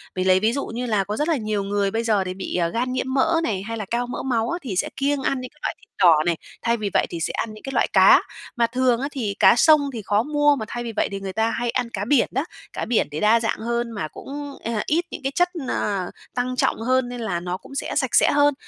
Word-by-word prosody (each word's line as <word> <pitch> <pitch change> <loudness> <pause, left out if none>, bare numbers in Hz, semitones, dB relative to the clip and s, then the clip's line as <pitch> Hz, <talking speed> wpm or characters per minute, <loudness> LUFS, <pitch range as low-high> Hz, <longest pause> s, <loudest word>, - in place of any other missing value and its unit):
Mình 185 0 -1
lấy 185 0 +5
ví 220 +4 +2
dụ 280 - -2
như 240 +2 -4
là 210 -5 +1
có 210 +2 -4
rất 300 - 0
là 325 -3 +2
nhiều 215 -3 -2
người 200 0 0
bây 225 +2 -1
giờ 215 -4 +2
thì 185 0 -4
bị, 190 +1 -5
ờ, 175 -2 +2
gan 245 +7 -2
nhiễm 260 0 -2
mỡ 325 +5 +3
này, 200 -10 -1
hay 230 +2 -5
là 215 - -4
cao 240 +1 0
mỡ 245 - -5
máu 235 -3 0
á 345 - -2
thì 235 - -5
sẽ 180 - 0
kiêng 280 0 0
ăn 265 0 -1
những 255 - -7
cái 300 - -27
loại - - -2
thịt 440 - -24
đỏ 175 -4 +7
này, 170 -2 +1 0.2
thay 235 0 +1
vì 210 -2 -2
vậy - - +3
thì 170 - -5
sẽ 165 - -1
ăn 220 - -3
những 215 - -13
cái 270 - -5
loại - - +2
cá, - - +7 0.3
mà 235 -1 +2
thường 250 0 +1
á 275 - -1
thì 220 -8 -3
cá - - +7
sông 290 +2 +5
thì 230 - -4
khó 205 +2 +1
mua 295 +1 +3
mà 220 - -4
thay 240 +1 -5
vì 235 - -4
vậy - - +1
thì 200 - -4
người 195 -1 -5
ta 220 +2 +1
hay 240 +1 -2
ăn 235 0 -1
cá 205 -3 -4
biển 255 +1 +3
đó. 270 +5 -1 0.3
Cá - - -3
biển 230 0 +1
thì 150 - -4
đa 215 +4 +4
dạng 225 -1 -1
hơn 235 +1 -2
mà 200 -8 -4
cũng, 285 - -8
a, 225 -2 -1
ít 335 +3 +1
những - - -7
cái 270 - -1
chất, 355 0 +3 0.2
ờ, 195 -4 -1 0.2
tăng 250 +1 -1
trọng 250 - +1
hơn, 255 +1 +1
nên 245 -1 -6
là 185 -6 -2
nó 180 +1 -4
cũng 275 - -13
sẽ - - -3
sạch 265 -4 +1
sẽ - - +5
hơn. 290 0 +4
235 Hz, 295 wpm, -23 LUFS, 205-265 Hz, 0.3 s, đỏ